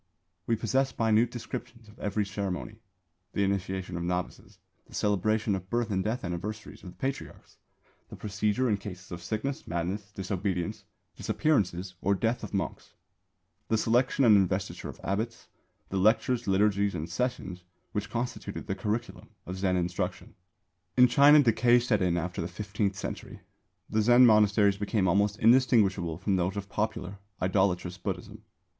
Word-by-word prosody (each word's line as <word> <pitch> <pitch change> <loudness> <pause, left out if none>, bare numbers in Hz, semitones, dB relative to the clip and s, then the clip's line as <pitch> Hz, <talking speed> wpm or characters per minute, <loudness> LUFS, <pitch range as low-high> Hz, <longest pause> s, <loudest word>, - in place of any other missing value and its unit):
We 115 - +3
possess 130 +4 0
minute 115 +1 +3
descriptions 115 -1 -7
of 105 +2 -17
every 105 0 -1
ceremony 100 +1 -4 0.6
the 100 - +1
initiation 95 -2 -2
of - - -3
novices, 90 +1 -4 0.3
the - - -12
celebration 105 +1 +1
of 95 -1 -4
birth 120 -1 0
and 95 -1 0
death 115 +4 -2
anniversaries 100 +5 -5
of 95 - -9
the - - -13
Patriarchs, 135 +1 -6 0.5
the - - -9
procedure 105 +4 0
in 105 -3 +2
cases 95 -2 -9
of 85 -1 -6
sickness, 110 +10 -3
madness, 95 +5 -3
disobedience, 95 -2 -3 0.3
disappearance 95 - 0
or 100 +1 +2
death 115 +5 -1
of - - -6
monks; 95 -5 -4 0.7
the 110 - +2
selection 125 +4 +2
and 110 -3 +7
investiture 95 0 0
of - - -10
abbots; 110 +5 -3 0.4
the 95 - -2
lectures, 115 +5 +2
liturgies 100 +1 +2
and 80 - -3
sessions 90 -2 -3 0.3
which 105 0 -3
constituted 120 +1 -4
the - - -2
curriculum 105 +4 -4 0.2
of 95 +1 -6
Zen 95 -1 +1
instruction. 90 0 -3 0.6
In 125 0 +8
China 145 +4 +7
decay 120 0 +4
set 120 -4 +1
in 90 -2 +2
after 90 +1 -3
the 85 - -2
fifteenth 100 +2 -2
century. - - -6 0.5
The 110 - +1
Zen 120 +3 +7
monasteries 105 -2 +5
became 105 -1 0
almost 100 +3 +2
indistinguishable 110 -9 +3
from 95 +1 0
those 90 +3 -1
of 100 0 -5
popular, 105 -2 -3 0.2
idolatrous 90 -1 0
Buddhism. 100 +2 -5
100 Hz, 150 wpm, -29 LUFS, 95-115 Hz, 0.7 s, In